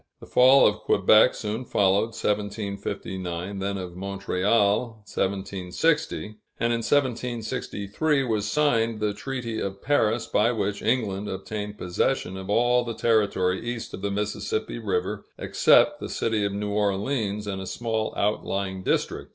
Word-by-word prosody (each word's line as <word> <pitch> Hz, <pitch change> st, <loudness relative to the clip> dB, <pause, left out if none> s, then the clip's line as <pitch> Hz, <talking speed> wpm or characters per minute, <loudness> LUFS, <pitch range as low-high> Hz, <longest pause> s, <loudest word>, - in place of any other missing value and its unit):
The -, -, -11 dB
fall 130 Hz, +2 st, +6 dB
of 105 Hz, -, +3 dB
Quebec 110 Hz, +5 st, +5 dB
soon 110 Hz, +3 st, -3 dB
followed 100 Hz, 0 st, +1 dB
(1759), 100 Hz, -3 st, -3 dB
then 100 Hz, +1 st, -2 dB
of 90 Hz, -2 st, -6 dB
Montreal 100 Hz, +3 st, 0 dB
(1760); 100 Hz, -, -1 dB, 0.2 s
and 115 Hz, +1 st, +1 dB
in -, -, +1 dB
1763 125 Hz, +1 st, -1 dB
was 110 Hz, -4 st, -1 dB
signed 115 Hz, -5 st, +2 dB
the 105 Hz, -1 st, 0 dB
Treaty 120 Hz, -1 st, -4 dB
of 100 Hz, 0 st, -4 dB
Paris, 120 Hz, -5 st, +2 dB
by 110 Hz, +3 st, +2 dB
which 100 Hz, -2 st, -2 dB
England 105 Hz, -5 st, 0 dB
obtained 105 Hz, +2 st, -5 dB
possession 90 Hz, +1 st, -1 dB
of 95 Hz, 0 st, -7 dB
all 120 Hz, +3 st, +3 dB
the 115 Hz, -1 st, -5 dB
territory 100 Hz, -5 st, +1 dB
east 120 Hz, -1 st, -5 dB
of -, -, -6 dB
the 100 Hz, -, -1 dB
Mississippi 105 Hz, -, -2 dB
River, 445 Hz, 0 st, -2 dB
except 295 Hz, 0 st, +4 dB
the -, -, -6 dB
city 110 Hz, -2 st, 0 dB
of 100 Hz, -, -1 dB
New 105 Hz, +1 st, -3 dB
Orleans 105 Hz, +1 st, -1 dB
and 95 Hz, -2 st, -4 dB
a 95 Hz, -, -6 dB
small 110 Hz, -1 st, -2 dB
outlying 100 Hz, -2 st, -1 dB
district. -, -, -1 dB
105 Hz, 140 wpm, -25 LUFS, 100-115 Hz, 0.2 s, fall